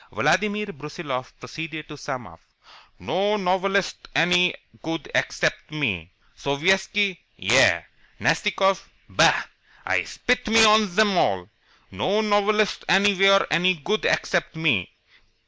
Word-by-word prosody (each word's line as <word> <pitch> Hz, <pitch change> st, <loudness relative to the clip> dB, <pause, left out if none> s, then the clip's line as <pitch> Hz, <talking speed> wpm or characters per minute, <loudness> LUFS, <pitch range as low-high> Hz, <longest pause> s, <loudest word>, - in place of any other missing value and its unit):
Vladimir 210 Hz, +1 st, 0 dB
Brusiloff 140 Hz, -3 st, -6 dB
proceeded 155 Hz, +4 st, -7 dB
to 150 Hz, -, -10 dB
sum 130 Hz, -4 st, -6 dB
up. 85 Hz, -2 st, -15 dB, 0.6 s
"No 200 Hz, +5 st, -1 dB
novelists 195 Hz, 0 st, -1 dB
any 180 Hz, +1 st, +3 dB, 0.3 s
good 165 Hz, +1 st, -5 dB
except -, -, -1 dB
me. 110 Hz, -, -3 dB, 0.3 s
Sovietski 190 Hz, +6 st, 0 dB, 0.2 s
yah! -, -, +4 dB, 0.4 s
Nastikoff 195 Hz, -2 st, 0 dB, 0.2 s
bah! -, -, +3 dB, 0.4 s
I -, -, +1 dB
spit 250 Hz, -1 st, -1 dB
me 225 Hz, +1 st, +6 dB
of 215 Hz, -1 st, +4 dB
zem 205 Hz, +2 st, +2 dB
all. 95 Hz, -, 0 dB, 0.4 s
No 190 Hz, -, 0 dB
novelists 210 Hz, 0 st, +1 dB
anywhere 195 Hz, 0 st, +4 dB
any 180 Hz, +2 st, +3 dB
good 205 Hz, +8 st, -2 dB
except 175 Hz, -2 st, 0 dB
me. 145 Hz, -, 0 dB
185 Hz, 110 wpm, -23 LUFS, 150-205 Hz, 0.6 s, me